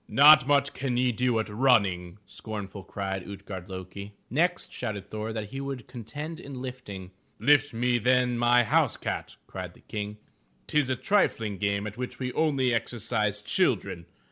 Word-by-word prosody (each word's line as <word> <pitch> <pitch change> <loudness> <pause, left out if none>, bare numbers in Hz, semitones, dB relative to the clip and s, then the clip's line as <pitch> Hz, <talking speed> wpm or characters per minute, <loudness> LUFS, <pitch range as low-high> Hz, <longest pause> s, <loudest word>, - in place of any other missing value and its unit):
"Not 150 -1 +8
much 140 -1 +3
can 130 -2 -2
ye 125 0 +3
do 125 0 +1
at 110 - -1
running,'' 105 -6 +2
scornful, 100 -3 -7
cried 95 -1 -4
Ut'gard 100 -1 -8
lo'ki. 95 +2 -7 0.2
Next 175 +7 +1
shouted 105 -5 -4
Thor 110 +2 -4
that 110 -2 -5
he 135 - -4
would 135 -3 -5
contend 145 +7 -7
in 135 -2 -8
lifting. 115 -8 -7 0.3
"Lift 145 0 +4
me 120 +1 +1
then 125 +1 +3
my 120 +1 +4
house 110 - +2
cat,'* - - -4
cried 90 -2 -7
the - - -19
King. 105 0 -5 0.2
" - - -39
'Tis 150 -3 +1
a 130 - +2
triflng 115 - +1
game 100 +1 0
at 105 +1 -6
which 125 0 -5
we 125 -1 -3
only 135 -6 +2
exercise 110 -2 -1
children. 85 -4 0
115 Hz, 170 wpm, -28 LUFS, 100-130 Hz, 0.3 s, Not